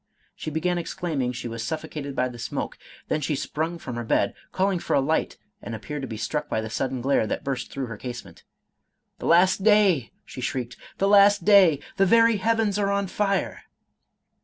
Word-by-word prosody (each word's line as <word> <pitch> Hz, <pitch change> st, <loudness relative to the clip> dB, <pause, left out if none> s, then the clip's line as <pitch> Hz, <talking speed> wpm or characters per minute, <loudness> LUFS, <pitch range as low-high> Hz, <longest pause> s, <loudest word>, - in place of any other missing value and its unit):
She -, -, -5 dB
began 175 Hz, +3 st, -1 dB
exclaiming 155 Hz, -7 st, -2 dB
she 125 Hz, -1 st, -6 dB
was 115 Hz, -1 st, -5 dB
suffocated 155 Hz, -1 st, -5 dB
by 125 Hz, -, +1 dB
the 120 Hz, -1 st, -9 dB
smoke; 115 Hz, -, -4 dB, 0.3 s
then 155 Hz, -, -1 dB
she 150 Hz, +1 st, -1 dB
sprung 160 Hz, +5 st, -3 dB
from 125 Hz, -7 st, -7 dB
her 120 Hz, -, -3 dB
bed, 100 Hz, -3 st, +1 dB, 0.2 s
calling 190 Hz, -1 st, +1 dB
for -, -, -1 dB
a -, -, +4 dB
light, 155 Hz, +4 st, 0 dB, 0.2 s
and 115 Hz, -, -6 dB
appeared 145 Hz, +7 st, -6 dB
to 135 Hz, -, -4 dB
be 110 Hz, -, -6 dB
struck 145 Hz, +8 st, -3 dB
by -, -, 0 dB
the 110 Hz, 0 st, -5 dB
sudden 130 Hz, +1 st, -2 dB
glare 135 Hz, -3 st, +2 dB
that -, -, -3 dB
burst 135 Hz, -2 st, -3 dB
through 135 Hz, -1 st, -4 dB
her 115 Hz, -3 st, -7 dB
casement. 120 Hz, -8 st, -8 dB, 0.3 s
— -, -, -52 dB
" -, -, -48 dB
The -, -, -4 dB
last 185 Hz, +3 st, +4 dB
day," 200 Hz, -, +4 dB
she 130 Hz, -, -9 dB
shrieked, 125 Hz, -1 st, -3 dB
" -, -, -23 dB
The 195 Hz, -, +1 dB
last 200 Hz, -2 st, +5 dB
day 200 Hz, -5 st, +7 dB
I 140 Hz, -, -6 dB, 0.2 s
The 195 Hz, -, +4 dB
very 230 Hz, +1 st, +5 dB
heavens 220 Hz, -1 st, +1 dB
are 200 Hz, -1 st, +1 dB
on 200 Hz, 0 st, 0 dB
fire 195 Hz, +1 st, -1 dB
155 Hz, 210 wpm, -25 LUFS, 125-195 Hz, 0.3 s, day